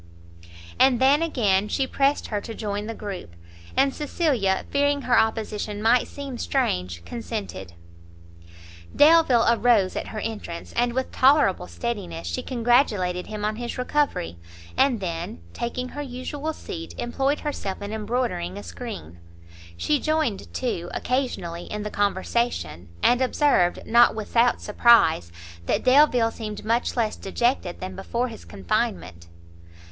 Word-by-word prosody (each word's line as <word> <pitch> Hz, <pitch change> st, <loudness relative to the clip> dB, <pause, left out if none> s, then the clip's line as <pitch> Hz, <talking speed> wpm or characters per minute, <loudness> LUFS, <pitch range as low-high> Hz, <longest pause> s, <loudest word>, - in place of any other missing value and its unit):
And 260 Hz, -3 st, +5 dB
then 275 Hz, +4 st, +4 dB
again 210 Hz, -11 st, +1 dB
she 265 Hz, +5 st, 0 dB
pressed 275 Hz, +2 st, +1 dB
her 210 Hz, -2 st, -2 dB
to 225 Hz, -, -7 dB
join 205 Hz, -1 st, -3 dB
the 230 Hz, -, -5 dB
group, 190 Hz, -, -7 dB, 0.4 s
and 275 Hz, 0 st, +3 dB
Cecilia, 275 Hz, -, 0 dB
fearing 285 Hz, 0 st, +1 dB
her 245 Hz, -, +2 dB
opposition 215 Hz, -2 st, 0 dB
might 230 Hz, +3 st, +3 dB
seem 275 Hz, -4 st, -7 dB
strange, 90 Hz, -, -1 dB
consented. 210 Hz, -, -6 dB, 1.2 s
Delvile 295 Hz, -6 st, +6 dB
arose 230 Hz, -4 st, +3 dB
at -, -, -3 dB
her 220 Hz, -, -7 dB
entrance, 210 Hz, -6 st, -6 dB
and, 240 Hz, 0 st, +1 dB
with 260 Hz, +1 st, -2 dB
tolerable 260 Hz, -, +4 dB
steadiness, 85 Hz, -2 st, -5 dB
she 85 Hz, 0 st, -3 dB
congratulated 225 Hz, -8 st, +1 dB
him 210 Hz, -1 st, -4 dB
on 215 Hz, 0 st, -1 dB
his 240 Hz, 0 st, -5 dB
recovery; 250 Hz, -, -1 dB, 0.4 s
and 260 Hz, -5 st, +2 dB
then, 170 Hz, -, -4 dB
taking 250 Hz, +2 st, -3 dB
her 290 Hz, -, -6 dB
usual 280 Hz, +3 st, -4 dB
seat, 85 Hz, -, -8 dB
employed 270 Hz, +4 st, -1 dB
herself 240 Hz, -10 st, -4 dB
in 205 Hz, +1 st, -6 dB
embroidering 215 Hz, -, -2 dB
a 100 Hz, -, -7 dB
screen. 85 Hz, -1 st, -8 dB, 0.6 s
She 295 Hz, -, +1 dB
joined 310 Hz, -10 st, -1 dB
too, 175 Hz, -9 st, -3 dB
occasionally, 205 Hz, -10 st, -2 dB
in 210 Hz, 0 st, -5 dB
the 210 Hz, -, -5 dB
conversation, 200 Hz, -, -1 dB
and 245 Hz, +1 st, +4 dB
observed, 255 Hz, -9 st, +2 dB
not 235 Hz, 0 st, +5 dB
without 230 Hz, +2 st, +1 dB
surprise, 210 Hz, -, +4 dB, 0.4 s
that -, -, +1 dB
Delvile 255 Hz, -4 st, +5 dB
seemed 215 Hz, -3 st, -7 dB
much 230 Hz, +3 st, 0 dB
less 220 Hz, -2 st, +1 dB
dejected 195 Hz, -2 st, -1 dB
than 185 Hz, 0 st, -5 dB
before 235 Hz, +6 st, -2 dB
his 225 Hz, -, -11 dB
confinement. 85 Hz, -1 st, -3 dB
225 Hz, 135 wpm, -24 LUFS, 185-255 Hz, 1.2 s, Delvile